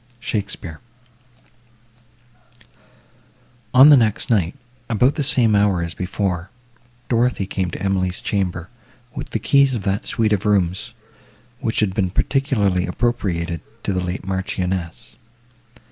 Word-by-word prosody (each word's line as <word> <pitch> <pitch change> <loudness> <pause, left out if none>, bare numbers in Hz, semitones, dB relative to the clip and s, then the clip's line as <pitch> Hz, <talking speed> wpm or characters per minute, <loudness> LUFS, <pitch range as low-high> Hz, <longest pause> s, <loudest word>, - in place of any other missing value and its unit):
SHAKESPEARE 100 -7 -4 2.9
On 130 +4 +8
the 150 - +9
next 115 -2 +1
night, 90 -7 +1 0.3
about 125 +5 +3
the 155 - -3
same 125 -6 +2
hour 100 -4 +2
as 85 -1 -3
before, 90 -1 -3 0.6
Dorothée 120 -4 +1
came 95 -2 -2
to - - -7
Emily's 95 -2 0
chamber, 90 -4 -2 0.5
with - - -6
the - - -1
keys 135 +4 +3
of 105 - -4
that 100 -1 -1
suite 110 -2 +1
of 100 -1 0
rooms, 95 -4 0 0.7
which 110 - -1
had 100 -3 +1
been 95 -2 0
particularly 100 - +1
appropriated 90 -6 -1 0.2
to 100 - -1
the 90 - -1
late 90 +1 -4
Marchioness. 95 +1 -3
100 Hz, 125 wpm, -21 LUFS, 90-115 Hz, 2.9 s, the